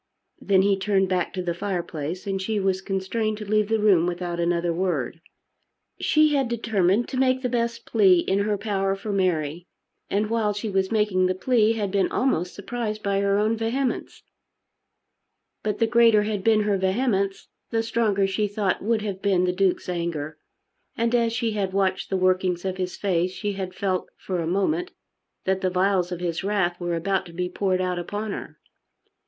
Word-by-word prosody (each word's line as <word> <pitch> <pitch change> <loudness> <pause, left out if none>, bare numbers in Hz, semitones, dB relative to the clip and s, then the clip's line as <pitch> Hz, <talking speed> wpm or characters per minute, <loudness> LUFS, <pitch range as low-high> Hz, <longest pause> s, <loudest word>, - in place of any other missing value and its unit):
Then 190 -1 +3
he 195 -1 +2
turned 195 -1 +1
back 180 -2 0
to 185 - -3
the 175 -1 -1
fireplace, 175 -2 -4
and 195 -1 -2
she 210 +2 -1
was 190 -1 0
constrained 210 +3 -2
to 210 - -7
leave 215 0 +1
the 225 - +2
room 195 -6 +4
without 175 -1 -3
another 170 0 +1
word. 165 -4 -2 0.8
She 305 -1 +3
had 275 -3 +2
determined 220 -2 +1
to 260 - -4
make 260 0 +2
the 250 - 0
best 235 -1 -2
plea 195 -5 +5
in 190 +3 0
her 205 0 0
power 195 -1 -1
for 205 +2 -5
Mary; 175 -4 -1 0.4
and 210 +2 0
while 220 -2 +1
she 210 +1 -4
was 190 +1 0
making 210 -4 +2
the 185 - 0
plea 225 +2 +3
had 205 -4 -2
been 200 -1 +1
almost 180 -9 0
surprised 215 0 -4
by 200 -1 +1
her 200 0 +2
own 215 +2 +2
vehemence; 235 +3 -2 1.4
but 210 -1 -2
the 230 - +3
greater 230 -2 +5
had 210 -2 -2
been 220 0 +4
her 205 -2 +1
vehemence, 195 0 0 0.2
the 225 -1 0
stronger, 220 -4 +1
she 200 +2 0
thought, 200 -2 -1
would 220 +1 0
have 195 -2 -4
been 190 -3 +2
the 180 0 +1
Duke's 190 -1 +1
anger. 165 -4 -3 0.6
And 230 +1 +1
as 235 -1 +3
she 230 -1 -1
had 200 -3 -2
watched 190 -1 0
the 190 - 0
workings 185 -1 +1
of 190 -1 -2
his 185 -1 -3
face 185 -2 0
she 205 0 -3
had 190 -2 -5
felt 185 -2 -1
for 185 -2 -3
a 165 - -2
moment 310 - 0 0.5
that 190 0 0
the 185 - +1
vials 185 0 +1
of 175 -1 -4
his 170 0 -2
wrath 190 -4 0
were 175 -1 -1
about 190 +3 -1
to 170 - -12
be 180 +1 -2
poured 185 0 0
out 180 -1 -1
upon 205 +4 -4
her. - - -7
195 Hz, 190 wpm, -24 LUFS, 185-215 Hz, 1.4 s, plea